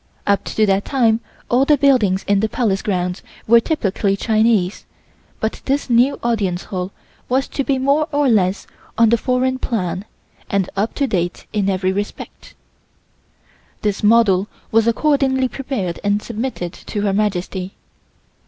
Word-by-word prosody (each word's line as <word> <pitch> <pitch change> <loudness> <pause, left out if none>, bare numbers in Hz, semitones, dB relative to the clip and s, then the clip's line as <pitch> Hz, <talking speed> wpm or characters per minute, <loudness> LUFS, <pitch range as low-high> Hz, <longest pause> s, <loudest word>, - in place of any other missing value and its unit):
Up 200 -1 +2
to 215 - +1
that 195 0 +2
time 230 -5 +2 0.3
all 250 +2 +3
the 295 +1 +4
buildings 245 -9 +3
in 200 0 +3
the 220 +2 0
Palace 205 -4 0
Grounds 180 -2 -2 0.2
were 235 +1 +6
typically 200 - 0
Chinese 215 -3 +1 0.6
but 220 - -3
this 275 -1 -1
new 245 +4 +3
Audience 200 -7 0
Hall 185 0 -4 0.4
was 260 +2 +1
to 275 - -2
be 270 0 0
more 280 +4 +2
or 290 -1 +2
less 195 -5 +2 0.3
on 230 -1 +5
the 235 - +5
foreign 260 +1 0
plan 185 -6 -2 0.4
and 200 -2 +1
up 205 +3 -1
to 280 - +1
date 175 -7 -2
in 200 -2 +1
every 185 -1 0
respect. 205 +2 -6 1.3
This 205 -2 -1
model 210 -3 +4 0.2
was 225 0 +3
accordingly 265 +1 +2
prepared 250 -10 -4
and 205 0 +2
submitted 220 -6 -4
to 205 - -5
Her 200 -1 +1
Majesty. 190 -2 -2
215 Hz, 150 wpm, -19 LUFS, 195-255 Hz, 1.3 s, were